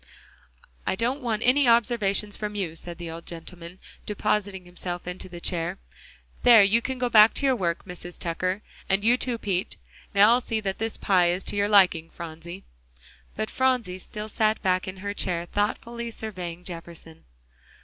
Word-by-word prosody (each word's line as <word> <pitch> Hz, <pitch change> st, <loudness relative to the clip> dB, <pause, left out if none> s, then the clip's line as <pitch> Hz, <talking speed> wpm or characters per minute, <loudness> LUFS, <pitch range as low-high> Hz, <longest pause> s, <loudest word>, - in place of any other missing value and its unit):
"I -, -, +1 dB
don't 245 Hz, +7 st, -1 dB
want 225 Hz, -3 st, -1 dB
any 260 Hz, +2 st, +5 dB
observations 215 Hz, -3 st, +3 dB
from 210 Hz, -1 st, -4 dB
you," 180 Hz, -6 st, -3 dB
said 170 Hz, +1 st, -6 dB
the 170 Hz, -1 st, -6 dB
old 165 Hz, +1 st, -9 dB
gentleman, 170 Hz, +1 st, -8 dB, 0.3 s
depositing 205 Hz, -2 st, -1 dB
himself 175 Hz, 0 st, -5 dB
in 180 Hz, +1 st, -5 dB
the 175 Hz, -2 st, -7 dB
chair. 170 Hz, -1 st, -2 dB, 0.6 s
"There, 230 Hz, -4 st, +8 dB
you 215 Hz, +4 st, +4 dB
can 260 Hz, +2 st, -3 dB
go 250 Hz, 0 st, 0 dB
back 220 Hz, -2 st, +7 dB
to 280 Hz, -, 0 dB
your 265 Hz, -1 st, +4 dB
work, 170 Hz, -6 st, -2 dB
Mrs. 175 Hz, -1 st, -7 dB
Tucker, 185 Hz, +4 st, -2 dB, 0.3 s
and 195 Hz, +1 st, +2 dB
you 235 Hz, +3 st, +5 dB
too, 250 Hz, -2 st, -2 dB
Pete. 195 Hz, -3 st, -1 dB, 0.4 s
Now 205 Hz, +3 st, +7 dB
I'll 245 Hz, +1 st, +4 dB
see 225 Hz, -2 st, -2 dB
that 195 Hz, -2 st, -3 dB
this 225 Hz, 0 st, -2 dB
pie 180 Hz, -3 st, +3 dB
is 180 Hz, +2 st, 0 dB
to -, -, -2 dB
your 205 Hz, 0 st, +1 dB
liking, 180 Hz, -5 st, +5 dB
Phronsie." 170 Hz, +2 st, -9 dB, 0.7 s
But 215 Hz, -, -3 dB
Phronsie 250 Hz, -8 st, +1 dB
still 210 Hz, +3 st, -6 dB
sat 215 Hz, 0 st, +1 dB
back 185 Hz, 0 st, +1 dB
in 185 Hz, 0 st, -6 dB
her 200 Hz, +2 st, -4 dB
chair, 175 Hz, -4 st, -1 dB
thoughtfully 235 Hz, +5 st, -2 dB
surveying 180 Hz, -6 st, -6 dB
Jefferson. 165 Hz, -2 st, -9 dB
195 Hz, 175 wpm, -26 LUFS, 175-220 Hz, 0.7 s, There